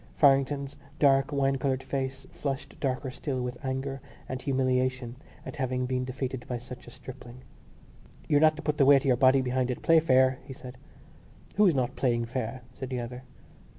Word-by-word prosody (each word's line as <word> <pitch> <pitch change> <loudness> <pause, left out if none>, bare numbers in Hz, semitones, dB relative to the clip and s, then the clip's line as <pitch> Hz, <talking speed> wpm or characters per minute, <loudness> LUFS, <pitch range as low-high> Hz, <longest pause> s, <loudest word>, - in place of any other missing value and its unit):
Farrington's 140 0 +3 0.2
dark 140 -1 +4
wine 135 -1 +1
coloured 135 -1 -1
face 135 -1 -3
flushed 140 0 -5
darker 130 -1 -2
still 130 0 -3
with 125 +2 -6
anger 135 0 -3 0.3
and 130 0 -4
humiliation 130 -2 0 0.3
at - - -7
having 130 -2 -1
been 125 0 -1
defeated 130 -1 -4
by 125 - -2
such 125 +1 -10
a - - -8
stripling. 125 0 -11 0.8
"You're 145 0 +3
not 155 0 +5
to 155 - -8
put 150 -1 -1
the 140 - +6
weight 140 -1 +7
of - - -7
your 130 -2 +4
body 130 +1 +5
behind 130 0 0
it. 125 - -4
Play 165 -1 +6
fair," 130 -4 +3
he 135 0 -9
said. 125 0 -11 0.8
"Who's 195 -6 +5
not 130 -1 0
playing 120 -3 +1
fair?" 125 0 -4
said 130 0 -6
the 130 -1 -2
other. 125 +1 -6
130 Hz, 185 wpm, -28 LUFS, 125-140 Hz, 0.8 s, weight